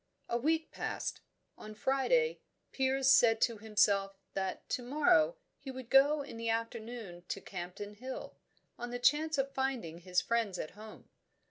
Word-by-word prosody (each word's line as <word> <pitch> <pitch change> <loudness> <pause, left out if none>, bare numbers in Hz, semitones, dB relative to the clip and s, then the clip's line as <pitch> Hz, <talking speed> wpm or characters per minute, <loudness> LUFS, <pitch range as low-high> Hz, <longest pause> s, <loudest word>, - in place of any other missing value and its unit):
A - - -1
week 320 +5 +1
passed. - - -4 0.4
On 215 0 -9
Friday, 275 - +2 0.3
Piers 265 0 +1
said 225 -4 +6
to 230 -3 +2
himself 200 -2 +2 0.2
that 190 -1 -3
to - - -1
morrow 240 - +3 0.2
he 275 - -9
would 260 -2 -8
go 285 +2 +5
in 230 - -9
the 230 0 -2
afternoon 225 -4 -4
to - - -3
Campden 190 +3 -7
Hill, 255 +3 -7 0.4
on 240 - -4
the 245 - -3
chance 300 +5 +3
of 275 0 -1
finding 250 -12 -2
his 180 0 +1
friends 220 -1 0
at 155 - -5
home. 215 +2 -12
235 Hz, 155 wpm, -33 LUFS, 205-270 Hz, 0.4 s, said